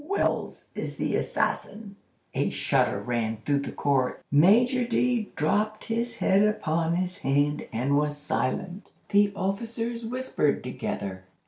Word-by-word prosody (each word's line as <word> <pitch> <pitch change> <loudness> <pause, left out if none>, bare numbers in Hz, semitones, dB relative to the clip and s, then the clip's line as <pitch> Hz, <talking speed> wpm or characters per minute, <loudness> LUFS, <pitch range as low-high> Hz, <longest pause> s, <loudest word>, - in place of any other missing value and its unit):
WELLS 400 - -1
is - - -4
the - - -1
assassin!'" 205 -1 -2 0.4
A - - +1
shudder - - +1
ran 115 -2 -1
through 145 -1 +2
the 140 - -4
court. 135 -3 0
Major 230 - +5
D—— 240 -2 +1
dropped 210 +8 0
his 230 +1 -2
head 195 +1 +3
upon 170 -6 +1
his 180 +1 -2
hand 145 -1 +1
and 130 +5 +1
was 145 0 +1
silent. 175 +7 -2 0.2
The 205 0 +4
officers 230 +4 -3
whispered 240 - 0
together. 100 -6 -4
190 Hz, 130 wpm, -27 LUFS, 145-225 Hz, 0.4 s, Major